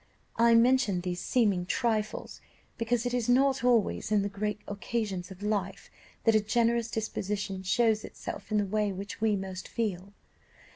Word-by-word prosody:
"I 230 0 +5
mention 230 -6 +4
these 180 0 -3
seeming 200 -8 +1
trifles 215 -1 -1 0.4
because 235 +1 0
it 245 - -1
is 245 -1 0
not 265 0 +3
always 235 -4 +2
in 210 -2 +3
the 200 - -2
great 210 +1 -3
occasions 205 -3 -3
of 190 +1 -10
life 200 -2 -2 0.3
that 225 - +4
a 215 - +5
generous 235 +1 +1
disposition 205 -3 -3
shows 220 +3 +2
itself - - -8
in 215 - +2
the 205 - +2
way 210 +1 0
which 200 +3 -7
we 220 -2 +3
most 190 -1 -5
feel. 200 -4 -3
215 Hz, 160 wpm, -29 LUFS, 195-230 Hz, 0.4 s, I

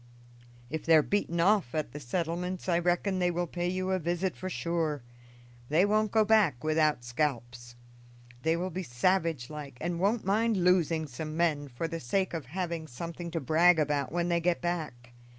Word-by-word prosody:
If 160 0 -3
they 165 - +5
are 155 - +6
beaten 175 -3 -1
off 185 - +3
at 155 -5 -2
the 150 - -7
settlements 175 +7 -3
I 170 -2 +3
reckon 180 +2 0
they 180 -1 +2
will 175 0 -1
pay 175 +1 -3
you 185 +1 -1
a 190 - +1
visit 175 +2 -1
for 185 - -5
sure; 165 -6 -2 0.7
they 165 +6 +4
won't 215 +1 +1
go 220 -1 +4
back 205 - +3
without 155 -4 +2
scalps. 120 -2 -3 0.7
They 160 +3 +1
will 185 +2 -3
be 185 +3 -3
savage 160 -1 0
like, 145 -4 -8
and 170 0 -2
won't 210 +4 +1
mind 220 +2 +2
losing 175 -3 +2
some 155 +3 -6
men 155 -4 +1
for 135 +5 -4
the 165 0 -5
sake 185 +10 -1
of 160 -6 -4
having 170 0 -4
something 170 +6 -6
to 165 0 -2
brag 165 +4 +4
about 145 -2 0
when 175 +1 0
they 170 0 +2
get 175 0 +1
back. 150 -9 -4
170 Hz, 185 wpm, -29 LUFS, 150-180 Hz, 0.7 s, are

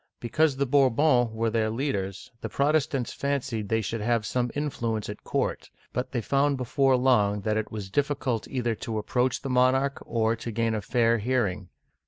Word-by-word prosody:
Because 150 +4 +1
the 140 +1 0
Bourbons 130 -1 +3
were 110 0 -1
their 110 -1 +1
leaders, 105 -7 -3
the - - -4
Protestants 140 -3 0
fancied 130 -7 -2
they 110 0 +2
should 110 +1 -3
have 115 0 +1
some 125 +3 0
influence 115 -8 -2
at 105 - -8
court; - - -2 0.2
but 125 - -2
they 120 - -1
found 140 +4 +1
before 130 +1 +2
long 105 -6 +3
that 105 +1 0
it 110 0 -2
was 100 -3 -6
difficult 140 -4 -1
either 120 -3 -1
to 110 +1 -4
approach 125 +5 0
the 135 - -3
monarch, 130 +2 +2
or 115 0 0
to 115 +1 -6
gain 115 0 0
a 110 - -1
fair 115 +2 +2
hearing. 105 -6 -1
120 Hz, 180 wpm, -27 LUFS, 110-135 Hz, 0.2 s, Bourbons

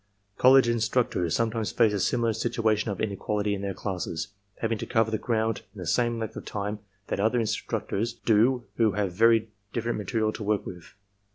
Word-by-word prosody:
College 130 -1 +7
instructors 115 -6 +1
sometimes 115 -1 0
face 115 -3 +3
a 100 - 0
similar 115 +4 +1
situation 110 -1 0
of 100 - -4
inequality 105 0 -1
in 100 - -3
their 100 -2 -3
classes, 90 -2 -4 0.3
having 115 -1 -1
to - - -5
cover 110 0 +2
the 110 - 0
ground 110 -1 0
in - - -10
the 90 - -5
same 120 +6 +1
length 110 -1 -4
of - - -6
time 105 +1 -4 0.3
that - - -3
other 110 +4 +2
instructors 115 0 -2
do 120 +4 +2
who 110 -3 +3
have 100 -2 -1
very 115 +2 +4 0.2
different 115 -1 -1
material 110 0 0
to - - -8
work 105 -1 0
with. 90 0 -10
110 Hz, 185 wpm, -27 LUFS, 100-115 Hz, 0.3 s, College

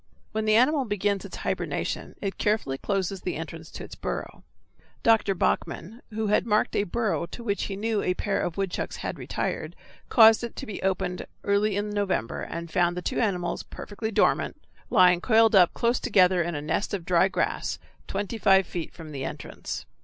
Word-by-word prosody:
When 215 0 -1
the 215 0 +4
animal 270 +5 +4
begins 205 -2 -1
its - - -8
hibernation - - -3
it 195 -1 -3
carefully 205 -11 0
closes 195 -1 -1
the 180 - -3
entrance 160 0 -7
to - - -8
its - - -10
burrow. - - -5 0.6
Dr. 220 -3 +4
Bachmann, 195 +5 -1
who 220 0 -2
had 210 +2 +2
marked 210 -1 +2
a 205 - +2
burrow 210 -3 -1
to 235 - -9
which 200 -3 -1
he 195 - -4
knew 215 +1 0
a 180 - 0
pair 200 +1 -1
of 175 -2 -3
woodchucks 195 -2 -2
had - - -4
retired, - - -3 0.3
caused 225 -1 +7
it 235 - -5
to - - -6
be 210 - -6
opened 185 -1 -1 0.2
early 200 0 +2
in 205 +1 -2
November, 200 - -1
and 170 -1 -6
found 175 +1 +2
the 180 - -4
two - - -1
animals, 185 -6 0
perfectly 220 +2 -6
dormant, 215 - +1 0.3
lying 180 -5 +5
coiled 225 0 +5
up 185 -4 +6
close 235 +1 +1
together 180 -2 +4
in 170 -1 -2
a 145 - -4
nest 160 +7 -1
of 180 -4 -6
dry 180 +1 +4
grass, - - -1 0.3
twenty 205 +3 -3
five 195 -2 +5
feet 170 -3 -5
from 160 -2 -9
the 135 -2 -5
entrance. - - -6
195 Hz, 190 wpm, -26 LUFS, 175-215 Hz, 0.6 s, caused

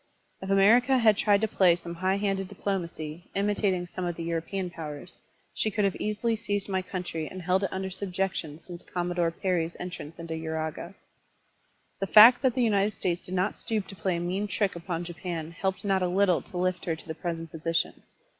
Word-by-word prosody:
If 190 - -6
America 235 +7 +5
had 220 -3 +5
tried 205 0 +3
to 220 - +2
play 185 -4 +4
some 170 0 -7
high 185 +3 0
handed 195 -2 -1
diplomacy, 170 -4 -4
imitating 200 -2 +1
some 180 +1 -6
of 175 -1 -2
the 165 - -5
Etiropean 170 +3 -2
powers, 155 +1 -8 0.3
she 220 - 0
could 210 -1 +1
have 195 - +1
easily 215 +2 0
seized 205 -2 -2
my 190 -2 0
country 180 -4 -4
and 185 - -8
held 185 +2 +2
it 195 - 0
tmder 190 0 -4
subjection 185 -5 -2
since 170 +1 -10
Commodore 175 -1 -1
Perry's 170 -1 -1
entrance 175 -3 -7
into 165 -1 -6
Uraga. 160 +2 -4 1.0
The 195 - -1
fact 225 +5 +9
that 260 -4 +2
the 255 - +2
United 210 -2 +2
States 175 -1 -1
did 185 - -6
not 185 +3 +1
stoop 215 -3 -2
to 195 - -8
play 185 -1 -1
a - - -2
mean 185 +4 -1
trick 200 -1 0
upon 170 0 -4
Japan 165 -1 -5
helped 190 +3 -3
not 195 -1 +2
a 180 - +2
little 185 -1 +3
to 180 - -9
lift 180 0 0
her 165 - 0
to 160 - -15
the 160 - -3
present 165 -1 -5
position. 165 +1 -1
185 Hz, 200 wpm, -28 LUFS, 170-200 Hz, 1.0 s, fact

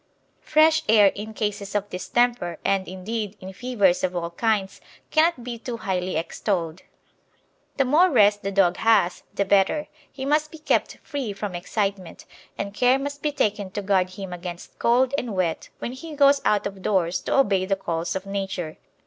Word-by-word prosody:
Fresh 315 +1 +4
air 210 -3 +6
in 215 +2 -7
cases 205 -2 -3
of 205 0 -1
distemper, 235 -2 0
and, 195 -1 +1
indeed, 205 +3 -4
in 190 +1 -9
fevers 205 -6 +1
of 185 -1 0
all 170 -1 -3
kinds, 205 0 -1 0.3
cannot 315 -5 +3
be 235 -1 -6
too 235 0 -5
highly 185 -4 -2
extolled. 170 0 -2 1.0
The 275 - +3
more 320 +8 +5
rest 205 - +4
the 195 - -3
dog 190 -3 +3
has 210 -6 +3
the 200 - +1
better; 200 +10 +2 0.2
he 265 -1 -6
must 305 +2 +1
be 320 - -11
kept 310 - 0
free 270 -8 -4
from 200 -1 -5
excitement, 195 0 -3 0.3
and 200 0 -4
care 250 +4 +4
must 285 +1 -5
be 300 - 0
taken 210 -8 -1
to 205 - -3
guard 190 -2 +2
him 190 -1 -7
against 175 0 -8
cold 250 +3 +3
and 230 -5 -5
wet 175 -3 -1
when - - -5
he 300 +5 -8
goes 280 -1 +5
out 210 -1 +2
of 195 -1 -5
doors 180 -3 +1
to - - 0
obey 195 -8 +3
the 195 - +2
calls 170 -3 -3
of 190 0 -4
Nature. 195 -5 -4
205 Hz, 180 wpm, -24 LUFS, 185-245 Hz, 1.0 s, air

